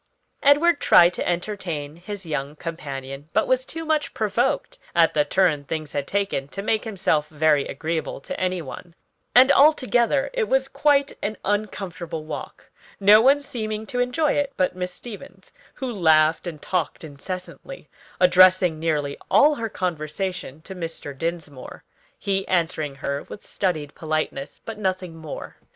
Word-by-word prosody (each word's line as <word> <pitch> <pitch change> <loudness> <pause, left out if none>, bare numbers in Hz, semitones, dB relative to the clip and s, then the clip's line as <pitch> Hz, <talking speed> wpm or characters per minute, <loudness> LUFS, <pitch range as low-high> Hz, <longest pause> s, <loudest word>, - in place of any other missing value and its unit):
Edward 290 +3 +5
tried 175 +1 +6
to - - -2
entertain 170 -5 -3
his 195 +2 -7
young 150 -2 -3
companion, 140 -3 -7
but - - +2
was 260 0 +1
too 325 +1 -6
much 310 -1 0
provoked - - 0 0.2
at 165 -1 +4
the 150 - +3
turn 155 -2 +2
things 155 0 -5
had 140 -1 -2
taken 200 -9 -1
to 195 +7 -6
make 220 +2 0
himself 190 -8 0
very 150 -2 +2
agreeable 160 +3 -3
to - - -6
any 185 -2 -1
one; 170 +5 -10 0.4
and 260 +3 +8
altogether 275 - +3
it - - +1
was 265 0 +2
quite 280 +1 +2
an 215 +1 -3
uncomfortable 190 -6 -3
walk: 155 - -8 0.3
no 205 +2 +7
one 275 +4 +5
seeming 220 -6 -4
to 245 - -4
enjoy 250 +5 +1
it 285 -1 0
but 185 0 +1
Miss 180 0 -3
Stevens, 190 -2 -11 0.2
who 255 -2 -4
laughed 160 -3 +3
and 160 -3 -6
talked 180 0 -2
incessantly; 180 - -8 0.3
addressing 180 -2 +5
nearly 150 -3 -1
all 300 +1 +6
her 230 -5 -3
conversation 170 -3 -4
to 190 - -8
Mr. 165 -5 -6
Dinsmore, 155 -3 -6 0.3
he 195 -1 -1
answering 160 -5 0
her 140 +1 -3
with - - -9
studied 155 -7 -2
politeness, 155 -3 -3
but 225 -1 -6
nothing 185 -4 -2
more. 160 -2 -8
180 Hz, 150 wpm, -23 LUFS, 155-215 Hz, 0.4 s, and